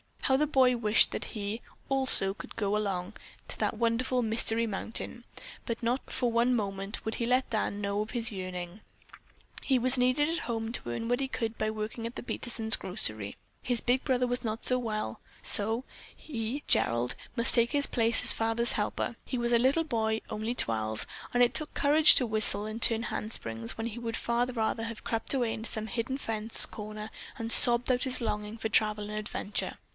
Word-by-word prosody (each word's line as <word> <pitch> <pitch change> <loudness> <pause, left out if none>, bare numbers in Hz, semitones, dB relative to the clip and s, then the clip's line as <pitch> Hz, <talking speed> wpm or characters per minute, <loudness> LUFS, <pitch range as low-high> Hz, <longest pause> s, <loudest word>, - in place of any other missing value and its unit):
How 265 - +3
the 300 +2 +1
boy 255 -3 +3
wished 215 -1 +3
that - - -4
he, 210 +2 -4 0.3
also, 265 -8 +5
could - - -11
go 205 -2 -1 0.7
to - - -5
that - - -1
wonderful 240 +2 0
Mystery 225 +1 +1
Mountain, 225 +3 -5 0.4
but 230 0 -5
not 245 +3 -2
for 245 -2 -1
one 240 +2 +2
moment 195 -2 -4
would 220 - -3
he 235 - -2
let 255 +2 +1
Dad 220 -3 -1
know 200 0 -3
of 215 +2 -6
this 235 -1 0
yearning. 185 -1 -7 0.8
He 265 - +1
was 255 +2 +6
needed 255 +5 +2
at 335 +1 -2
home 225 -1 -3
to 235 - -3
earn 225 - -4
what 245 +1 +1
he 270 - -2
could 230 -4 -4
by 215 - -1
working 220 +2 -5
at 235 - -10
the - - -7
Peterson 235 -2 -5
grocery. 110 - +1 0.3
His 245 -2 -2
big 250 +2 0
brother 250 -1 +1
was 245 +1 -1
not 225 +2 -2
well, 215 - -2 0.2
so 225 +4 +4 0.3
he, 245 0 -6
Gerald, 120 +1 +1 0.2
must 235 0 +7
take 235 -1 +2
his 285 -1 +2
place 230 -1 +3
as - - +4
father's 225 +1 +1
helper. 215 +2 -3
He 255 - -4
was 240 0 -1
a 235 - +4
little 270 +7 +2
boy, 220 -6 -2
only 220 +3 -4
twelve, 110 - -1 0.3
and 245 0 +4
it 240 - +2
took 305 - 0
courage 300 +2 +6
to 255 - +6
whistle 215 -2 +4
and 215 +2 -6
turn 230 0 +3
handsprings 115 - -4
when 225 0 -3
he 235 +1 -7
would 230 -1 -4
far 235 +1 0
rather 225 -2 -2
have 230 -1 -7
crept 225 +3 -1
away 245 -4 0
into 225 +1 -6
some 220 0 -5
hidden 240 +3 -3
fence 225 -3 +3
corner 215 0 -8 0.3
and 230 0 -4
sobbed 240 +2 +6
out 250 0 0
his 260 -2 -3
longing 210 -1 -4
for 220 0 -4
travel 210 -1 +2
and 210 0 -4
adventure. 210 -1 -4
230 Hz, 195 wpm, -29 LUFS, 215-245 Hz, 0.8 s, must